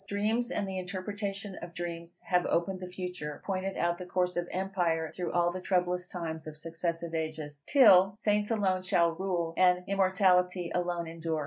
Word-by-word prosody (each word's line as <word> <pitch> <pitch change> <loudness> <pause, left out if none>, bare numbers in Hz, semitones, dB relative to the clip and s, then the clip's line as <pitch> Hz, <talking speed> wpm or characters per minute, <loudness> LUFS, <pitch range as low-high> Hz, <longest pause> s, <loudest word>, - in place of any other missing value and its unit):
Dreams, 220 +4 0
and 200 - -1
the 190 -1 -3
interpretation 195 +1 -5
of 170 0 -9
dreams, 170 0 -6
have 180 -1 +1
opened 185 +2 0
the 185 - -6
future, 180 -5 -6
pointed 195 0 -2
out 175 +1 0
the 180 - -6
course 180 0 0
of 175 0 -1
empire 175 -4 -1
through 175 -2 -3
all 175 0 +2
the 185 +1 -5
troublous 180 -1 0
times 160 -3 -5
of 155 -1 -8
successive 165 +1 -3
ages, 155 -3 -4
till 195 -8 +7
Saints 210 -1 +1
alone 195 -5 +1
shall 170 -2 +2
rule, 170 -1 -2
and 180 -1 +4
immortality 185 -2 +2
alone 175 -1 -1
endure. 165 -1 -3
180 Hz, 175 wpm, -30 LUFS, 170-190 Hz, -, till